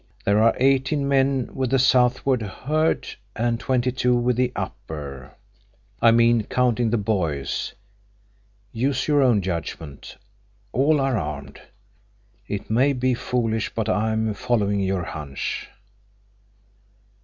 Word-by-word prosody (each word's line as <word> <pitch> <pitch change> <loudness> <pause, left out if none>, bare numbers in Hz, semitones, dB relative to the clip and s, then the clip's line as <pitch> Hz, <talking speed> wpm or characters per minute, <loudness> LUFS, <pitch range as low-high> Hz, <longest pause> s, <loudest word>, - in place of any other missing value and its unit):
There 100 +2 +3
are 115 0 +4
eighteen 135 +2 +2
men 135 -2 +1
with 130 -2 -1
the 135 - +3
southward 130 0 +3
herd, 150 +10 -1 0.3
and 115 0 0
twenty 125 -1 0
two 125 0 +1
with 120 0 +1
the 125 0 +1
upper. 70 -5 -7 0.7
I 115 - +7
mean, 115 -1 +4
counting 120 -2 +1
the 120 - +1
boys. 85 -10 -2 1.0
Use 130 +3 -1
your 145 -2 +3
own 120 -7 +3
judgment. 80 -5 -6 0.5
All 145 +4 +3
are 135 -2 +1
armed. 70 -1 -6 0.9
It 100 0 -4
may 130 +6 +3
be 130 0 +1
foolish, 115 -3 -2
but 110 -1 -1
I'm 110 0 0
following 100 -2 0
your 95 -2 0
hunch." 75 -4 -5
120 Hz, 120 wpm, -23 LUFS, 100-130 Hz, 1.0 s, I